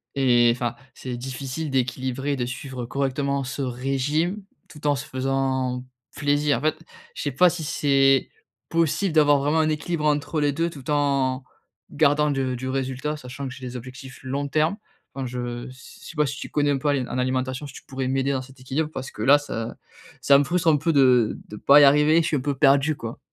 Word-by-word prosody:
et 120 -3 +4
enfin 120 -1 -3 0.2
c'est 125 -2 -6
difficile 135 +4 -5
d'équilibrer, 130 +2 -1
de 120 -2 -2
suivre 130 -1 -6
correctement 140 +1 -1
ce 140 +2 -5
régime 135 +9 -1 0.3
tout 150 -1 -6
en 145 - +3
se 135 - -5
faisant 130 -1 -1 0.3
plaisir. 145 -2 +1
En - - -10
fait, 155 +1 0 0.4
je - - -5
sais 145 - -1
pas 180 +7 +5
si 165 -2 -5
c'est 135 -2 +3 0.4
possible 165 +2 +1
d'avoir 145 -2 +5
vraiment 150 +3 +1
un 155 0 +2
équilibre 155 +1 -2
entre 150 +1 0
les 145 -1 +2
2 165 +3 0
tout 140 -4 -11
en 140 -3 +1 0.5
gardant 150 +1 +3
du 130 -2 -1
du 130 +1 -4
résultat. 135 +3 -2
Sachant 135 +1 -7
que 130 - -7
j'ai 130 -1 -9
des 125 - -8
objectifs 130 +2 -10
long 140 +2 -2
terme. 155 +7 +1 0.4
Enfin 135 -1 -4
je 120 0 -5
s 130 +1 -14
sais - - -10
pas 150 - +3
si 140 +1 -4
tu - - -7
connais 145 -1 +1
un 140 - +1
peu 150 - 0
a - - +3
en 130 -2 -2
alimentation. 130 +2 -2
Si - - -11
tu - - -11
pourrais 130 -1 -4
m'aider 135 +1 0
dans 130 -1 -1
cet 130 0 -16
équilibre. 140 +4 -2
Parce 130 0 -6
que - - -9
là 145 +2 +7
ça 115 -5 -5 0.5
ça 140 -1 +6
me - - +3
frustre 175 0 -1
un 150 - +4
peu 165 +3 0
de 125 -5 +4
de 105 - -8
pas 140 +6 +6
y - - +8
arriver, 150 +3 +5
je 165 - -1
suis 150 - +1
un - - -3
peu 140 0 -2
perdu 140 +2 +4
quoi. 115 +3 -7
135 Hz, 215 wpm, -24 LUFS, 130-150 Hz, 0.5 s, y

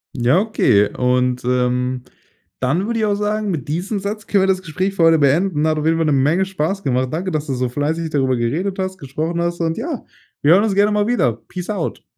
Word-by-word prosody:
Ja, 125 +6 +3
okay. 125 - +2
Und, 125 0 +1
ähm, 125 0 0 0.6
dann 155 +10 0
würde 230 0 -1
ich 215 - +1
auch 205 -1 +1
sagen, 210 0 -1
mit 160 -8 -3
diesem 190 +7 -2
Satz 205 +2 -5
können 200 -2 +3
wir 195 - +2
das 185 -1 +1
Gespräch 185 +3 -2
für 170 - +2
heute 165 0 +6
beenden. 150 +3 +2
Hat 155 -1 +1
auf 150 - -3
jeden 165 0 +2
Fall 165 - +1
'ne 150 - +2
Menge 150 +8 +2
Spaß 190 +1 -2
gemacht. 130 0 0
Danke, 180 +4 -2
dass 155 -1 -2
du 135 - -2
so 125 0 -1
fleißig 155 +5 -2
darüber 130 -4 +1
geredet 160 +12 -1
hast, 190 0 -3
gesprochen 160 +5 -3
hast 170 0 -2
und 165 0 -1
ja, 270 +2 -4 0.4
wir 150 +3 +5
hören 195 +3 +5
uns 215 -3 0
gerne 205 +1 +3
mal 210 0 +1
wieder. 195 - +2
Peace 180 +1 -7
out. 195 -6 -3
165 Hz, 230 wpm, -19 LUFS, 135-195 Hz, 0.6 s, heute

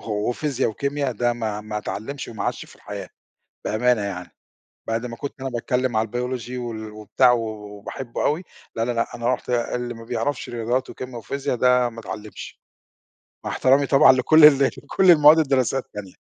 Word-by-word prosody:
وفيزيا 125 +6 -1
وكيميا، 140 +4 -2
ده 120 +2 0
ما 110 -3 -3
ما 105 0 -5
اتعلمش 135 +7 -6
وما 110 -4 -5
عاشش - - -2
في - - -17
الحياة - - -8 0.6
بأمانة، 120 +1 +2
يعني 95 -3 -5 0.6
بَعد 115 +2 -1
ما 115 -1 -7
كُنت 140 0 -7
أنا 135 - -3
باتكلم 125 0 -1
على 110 +1 +1
الBiology 125 +1 -4
وال 110 -3 -6
وبتاع 110 +4 +3
و 120 - +1
و 105 -2 -7
وباحبُّه 120 +3 -5
أوي، 155 +5 0 0.3
لا، 115 - 0
لا، 120 - 0
لأ، 115 0 -2
أنا 120 +2 +1
قُلت 125 - -9
اللي 120 0 -1
ما 115 0 -11
بَيعرَفش 125 +4 -3
رياضيات 120 +2 -2
وكيميا 130 -1 -8
وفيزيا، 140 +4 -3
ده 125 0 +3
ما 115 -1 -9
اتعلمش، 105 -1 -9 0.8
مع - - -3
احتَرامي 135 +2 +3
طبعًا 135 -1 +7
لكُل 150 +5 +5
ال 150 -2 +9 0.3
لكُل 190 -1 +4
المواد 150 0 +7
الدراسية 135 -4 +2
التانية. 105 -7 -9
120 Hz, 175 wpm, -23 LUFS, 110-135 Hz, 0.8 s, ال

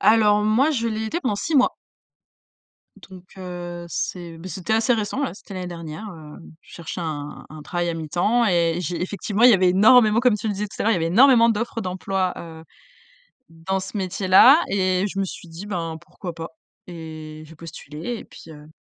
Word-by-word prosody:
Alors, 210 0 +4
moi, 235 +9 +3
je 230 -5 -1
l'ai 220 0 -3
été 320 +11 -3
pendant 220 -9 -1
6 315 +9 -3
mois 260 -3 +3 1.3
donc 185 -2 -12
heu, 175 -2 -7
c'est, 170 -1 -4
beh, 165 +3 -9
c'était 185 +2 -3
assez 225 +2 +3
récent, 220 +4 -2
là, 275 - -2
c'était 200 0 -12
l'année 185 -1 -5
dernière, 170 +3 -7
heu, 155 -5 -11 0.2
je - - -18
cherchais 170 +1 -6
un 150 -2 -6
un 155 0 -10
travail 175 +2 -2
à - - -2
mi-temps 175 +9 0
et 170 -3 +2
j'ai 175 0 -3
effectivement 200 +3 -2
il 250 - +9
y - - +7
avait 185 -2 +4
énormément, 215 +4 +5
comme 250 -4 +4
tu 220 - -4
le 210 - 0
disais 205 +2 -3
tout - - -13
à - - 0
l'heure, 225 - +3
il - - +4
y - - +1
avait 165 -2 -1
énormément 235 +5 +6
d'offres 230 +1 -2
d'emploi, 185 0 -2
heu, 160 -1 -10 0.9
dans 165 +4 -3
ce 190 +3 -7
métier-là 190 - +5
et 185 0 +1
je 195 - -6
me 195 - +1
suis 185 -1 -8
dit: 165 +4 -9
«Ben, 170 -5 -4
pourquoi 175 +1 -9
pas?» 165 0 -7 0.4
et 155 -2 -9
j'ai 160 - -14
postulé 165 - -7
et - - -10
puis, 165 - -14
heu 150 0 -13
185 Hz, 205 wpm, -22 LUFS, 165-215 Hz, 1.3 s, il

